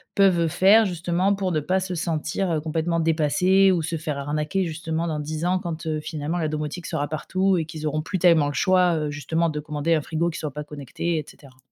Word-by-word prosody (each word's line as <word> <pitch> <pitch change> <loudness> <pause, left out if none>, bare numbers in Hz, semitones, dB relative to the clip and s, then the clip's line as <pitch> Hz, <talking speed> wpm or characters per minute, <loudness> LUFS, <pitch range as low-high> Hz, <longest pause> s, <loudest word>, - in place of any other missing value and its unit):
peuvent 185 -4 +4
faire, 200 +7 +5
justement, 180 +2 0
pour 190 -2 -2
ne 155 - +1
pas 185 +6 0
se 185 -1 -4
sentir, 170 +2 -2
heu, 155 - +1
complètement 165 +2 -1
dépassées, 180 +5 +3
ou 170 -3 +1
se 165 +2 -2
faire 150 -2 -4
arnaquer, 150 +6 -1
justement, 165 0 -3
dans 155 -3 -2
10 155 +2 -4
ans 185 +1 +2
quand, 170 -3 -5
heu, 155 -1 -1
finalement, 155 +2 -3
la 160 - 0
domotique 155 +3 -4
sera 145 0 -2
partout, 185 +5 0
et 160 - -1
qu'ils 155 -1 -7
auront 155 +1 -1
plus 185 +4 -3
tellement 165 -4 +4
le 145 - -3
choix, 180 +3 +3
heu, 150 -1 -2
justement, 160 +4 -1
de 150 -1 -3
commander 150 +2 -1
un 155 - +2
frigo 165 +3 -1
qui 175 - -6
soit 150 -2 -4
pas 150 +2 -6
connecté, 150 +3 -4
et 150 - -6
cetera? 130 -3 -16
160 Hz, 230 wpm, -24 LUFS, 150-180 Hz, -, faire